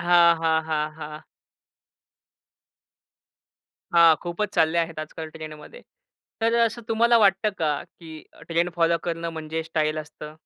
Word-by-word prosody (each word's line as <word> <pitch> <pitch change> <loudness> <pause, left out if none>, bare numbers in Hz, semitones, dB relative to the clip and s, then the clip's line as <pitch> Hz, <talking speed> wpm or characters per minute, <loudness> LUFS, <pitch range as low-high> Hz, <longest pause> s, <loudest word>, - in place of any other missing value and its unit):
हां, 170 -1 +5
हां, 160 -1 +2
हां, 155 -1 -1
हां. 150 -1 -8 2.7
हां, 165 -2 +7
खूपच 175 +4 -3
चालले 160 +1 +2
आहेत 165 -1 -2
आजकाल 155 +1 -6
ट्रेंड 155 -1 -8
मध्ये. - - -13 0.6
तर 230 +1 +2
अ, 235 0 +4
असं 235 +1 -6
तुम्हाला 235 +1 +4
वाटतं 200 0 +3
का, 150 -3 0
की 160 -2 -13 0.3
ट्रेंड 170 +1 +1
फॉलो 170 0 +2
करणं 170 -1 -3
म्हणजे 160 +1 -4
स्टाईल 155 -1 -1
असतं? 150 0 -9
165 Hz, 140 wpm, -24 LUFS, 155-175 Hz, 2.7 s, हां